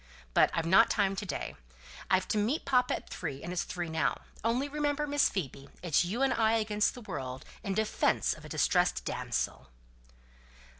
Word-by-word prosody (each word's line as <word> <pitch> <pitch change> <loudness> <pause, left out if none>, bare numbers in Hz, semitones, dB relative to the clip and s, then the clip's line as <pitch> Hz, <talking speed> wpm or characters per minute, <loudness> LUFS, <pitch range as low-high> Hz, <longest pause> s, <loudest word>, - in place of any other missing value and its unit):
But - - +5
I've 165 - 0
not 190 +7 +6
time 195 -2 +1
to 205 0 -4
day. - - -4 0.5
I've 185 0 +3
to 215 - +1
meet 240 +10 0
papa 250 -2 +3
at - - -9
three, 140 -6 -5
and 175 - -4
it's 180 - 0
three 175 -1 -4
now. 160 0 0 0.2
Only 240 +5 +1
remember, 295 0 -1
Miss 290 0 +3
Phoebe, 140 -7 -5
it's 170 -1 +3
you 215 +10 -1
and 270 - +3
I 220 -1 +3
against 210 0 +1
the 245 - -9
world, 130 - -6 0.2
in 195 -1 -2
defence 220 0 +1
of - - -13
a - - -10
distressed - - +2
damsel." 65 - -2
205 Hz, 185 wpm, -31 LUFS, 170-245 Hz, 0.5 s, not